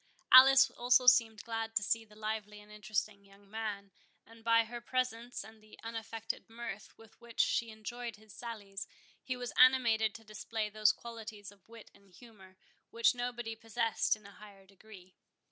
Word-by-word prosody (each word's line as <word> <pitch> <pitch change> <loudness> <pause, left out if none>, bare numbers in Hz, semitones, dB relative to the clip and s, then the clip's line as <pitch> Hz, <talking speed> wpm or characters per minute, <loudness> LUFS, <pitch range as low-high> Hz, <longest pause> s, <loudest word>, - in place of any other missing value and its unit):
Alice 265 +1 +9
also 250 +1 +3
seemed 230 -3 +5
glad 225 -1 -4
to 210 - +2
see 225 +3 0
the 210 -1 -19
lively 215 -1 -5
and 210 0 -16
interesting 210 0 -3
young 200 0 -21
man; 205 -2 -5 0.3
and 225 0 -17
by 230 0 +4
her 240 +1 -8
presence, 245 -2 -3
and 220 +1 -15
the 215 0 -17
unaffected 225 -1 -6
mirth 225 -3 -8
with 225 +1 -19
which 235 -1 -13
she 235 - +2
enjoyed 230 +2 -7
his 215 -1 -17
sallies, 205 -4 -7 0.3
he 255 -1 -4
was 245 -1 -5
animated 235 -4 +5
to 225 - -11
display 215 0 -5
those 215 0 +4
qualities 220 -3 -9
of 200 0 -24
wit 230 -1 -14
and 200 -2 -22
humour, 195 -6 -16 0.3
which 230 +1 +3
nobody 240 -2 -4
possessed 225 0 0
in 210 -1 -19
a 200 - -12
higher 200 -2 -15
degree. 190 -1 -16
220 Hz, 170 wpm, -33 LUFS, 210-235 Hz, 0.3 s, Alice